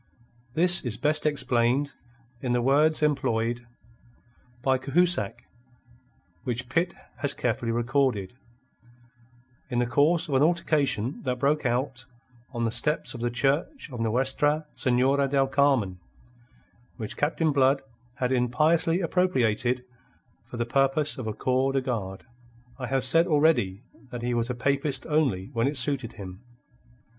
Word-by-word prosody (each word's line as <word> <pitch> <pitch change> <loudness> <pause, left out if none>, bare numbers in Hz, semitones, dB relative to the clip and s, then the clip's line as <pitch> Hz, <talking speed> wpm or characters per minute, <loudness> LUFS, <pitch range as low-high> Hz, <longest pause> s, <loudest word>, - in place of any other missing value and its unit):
This 180 +2 +3
is 120 -4 -3
best 155 +1 +1
explained 135 -1 +1 0.5
in 125 -2 -1
the 120 - +1
words 150 +4 +3
employed 120 -5 0 1.0
by 130 -1 +2
Cahusac 140 - +1 1.0
which 125 0 -3
Pitt 170 +5 0 0.2
has 145 -2 -2
carefully 115 -1 -1
recorded 120 -4 0 1.4
in 125 - -2
the 120 - +2
course 150 +8 +2
of 145 - -4
an 130 - +3
altercation 150 -7 +1
that 125 -2 -2
broke 145 +1 +1
out 125 0 -2 0.4
on 120 -3 -3
the 115 - 0
steps 150 +7 +1
of 120 - -8
the 120 - 0
Church 145 - -1
of 120 - -7
Nuestra 135 +6 +1
Senora 135 +2 +2
del 135 0 +2
Carmen, 130 -9 +1 1.0
which 110 -4 -6
Captain 160 +1 0
Blood 135 0 +2 0.3
had 125 0 -1
impiously 155 +8 +2
appropriated 125 - +1 0.6
for - - -8
the 120 - -1
purpose 135 +4 +1
of 120 - -5
a 110 - -2
corps 130 +1 0
de 135 - +1
garde. 105 -7 -4 0.5
I 130 - -4
have 135 +1 0
said 165 +6 +4
already 140 - +2 0.3
that 120 -1 -7
he 120 0 -1
was 120 0 -1
a 125 - -2
papist 140 +2 0
only 135 - 0
when 115 +2 +1
it 145 0 -1
suited 130 -2 0
him. 95 -2 -9
130 Hz, 140 wpm, -26 LUFS, 120-145 Hz, 1.4 s, said